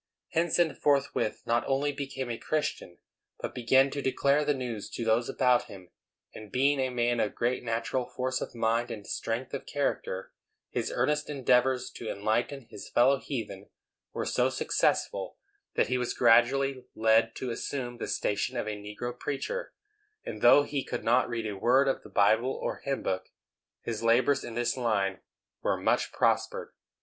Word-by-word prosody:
Henson 165 -1 +2
forthwith 140 -6 0
not 120 +1 +2
only 140 +2 +1
became 135 -3 -4
a 115 - -3
Christian, 150 - -2 0.4
but - - -5
began 130 +3 +3
to 140 - -3
declare 140 +2 +2
the 145 -1 +1
news 120 -5 -5
to 115 +1 -4
those 115 +2 +2
about 125 -1 +3
him; 95 -6 -12 0.4
and, 110 -2 -10
being 140 +2 +2
a 130 -1 +1
man 120 -1 0
of 105 - 0
great 120 +2 0
natural 115 +2 -1
force 130 0 -2
of - - -5
mind 115 +1 +1
and 105 -4 -7
strength 115 +7 -3
of 140 - -5
character, 135 -9 -2 0.4
his - - -2
earnest 150 0 0
endeavors 130 -2 +2
to 115 - -7
enlighten 110 +7 -1
his - - -9
fellow 130 +3 +4
heathen 130 -5 -6 0.4
were - - -3
so - - +2
successful - - 0 0.4
that - - +3
he 125 +1 0
was 125 - -2
gradually 130 +3 +3
led 110 +1 +3
to 125 - -4
assume 120 0 -4
the - - -3
station 125 +5 -1
of - - -1
a 105 - -2
negro 105 +4 -5
preacher; 145 - -4 0.5
and - - -6
though 145 - +7
he 145 -2 -2
could 120 - -4
not 120 +2 +3
read 115 -2 -3
a 105 -2 -3
word 130 +7 +3
of 135 - 0
the - - -13
Bible 110 +5 +3
or - - -3
hymn 140 -1 -3
book, 95 0 -2 0.5
his 115 -2 -3
labors 120 +4 +3
in 115 - -7
this 120 0 0
line 100 -6 0 0.4
were - - +1
much - - +1
prospered. - - 0
125 Hz, 170 wpm, -29 LUFS, 115-135 Hz, 0.5 s, though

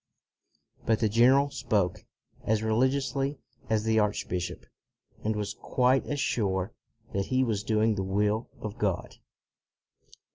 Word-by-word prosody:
But 110 -1 +2
the 110 - +2
general 130 +6 +4
spoke 105 -8 -1 0.4
as 110 0 +1
religiously 135 +5 +1 0.3
as 110 -1 +2
the 110 0 +3
archbishop, 90 -4 -2 0.6
and 110 0 0
was 105 -1 -3
quite 130 +1 +1
as 145 -1 -2
sure 95 -7 0 0.4
that 100 0 -1
he 130 0 +2
was 110 -5 0
doing 110 0 +2
the 100 - -2
will 105 +4 0
of 110 0 -6
God. 100 -4 -1
110 Hz, 130 wpm, -28 LUFS, 105-125 Hz, 0.6 s, general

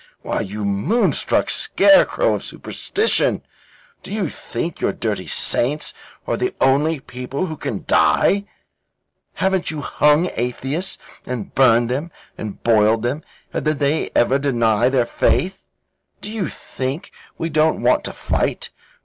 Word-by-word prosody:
"Why, - - -2
you 105 +2 -4
moonstruck 100 - +1
scarecrow 300 +11 +4
of - - -3
superstition, 435 +2 -1 0.6
do - - -11
you 200 -6 -1
think 155 +8 -5
your - - +1
dirty - - -3
saints 150 +5 +1 0.3
are - - -1
the 375 0 -2
only 145 +4 +2
people 130 +5 -5
who 160 -3 -5
can - - -5
die? 200 +1 +3 0.9
Haven't 190 -1 0
you 155 -2 -4
hung 150 +5 +2
atheists, 135 +9 -2 0.3
and 125 -5 -5
burned 120 -3 +4
them, 145 +7 -2 0.3
and 105 -2 -7
boiled 110 0 +3
them, 130 +6 -1 0.3
and - - -2
did 155 -1 0
they 145 +2 0
ever 130 +3 +3
deny 120 -4 +2
their 130 -2 +2
faith? 185 +9 0 0.6
Do 210 - -7
you 215 -6 -2
think 135 +9 -5 0.3
we 165 - -2
don't 155 0 +2
want - - +3
to - - -3
fight? - - -2
140 Hz, 140 wpm, -20 LUFS, 120-170 Hz, 0.9 s, scarecrow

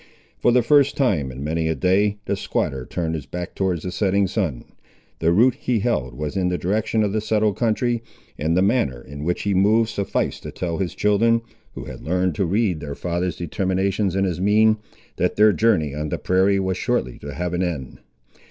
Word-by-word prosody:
For 120 - +3
the 125 0 +4
first 140 +3 +4
time, 90 - +1
in 65 +2 -7
many 80 +2 -1
a 80 - 0
day, 100 +4 +2
the 100 - 0
squatter 65 -8 -2
turned 80 -2 -2
his 80 -3 -5
back 90 +1 -6
towards 95 -4 -1
the 90 - -4
setting 100 +1 +1
sun. 90 - -2 0.5
The 80 +1 +2
route 120 +8 +5
he 125 0 -1
held 65 - -1
was 75 +6 -4
in 95 -2 +1
the 90 - -1
direction 110 +4 0
of 100 -1 -1
the 110 - 0
settled 110 -1 +1
country, 120 +1 0 0.3
and 80 +3 0
the 95 - +4
manner 100 - +1
in 70 +4 -9
which 90 +2 -1
he 100 - 0
moved 110 +4 +3
sufficed 100 - -2
to - - -7
tell 85 -2 -3
his 95 -3 -2
children, 115 +3 +3 0.3
who - - -6
had - - -9
learned 90 +2 0
to 95 - 0
read 95 -3 +1
their 75 -2 -6
father's 90 -1 -2
determinations 95 +3 -1
in 95 - +1
his 90 -3 -1
mien, 110 +2 +4 0.4
that - - 0
their 105 0 +5
journey 80 -11 +2
on 75 +1 -3
the - - -2
prairie 95 +2 +2
was 95 -1 -1
shortly - - -1
to 70 0 -7
have 90 +2 -3
an 90 - 0
end. 80 -8 -4
95 Hz, 210 wpm, -22 LUFS, 80-105 Hz, 0.5 s, route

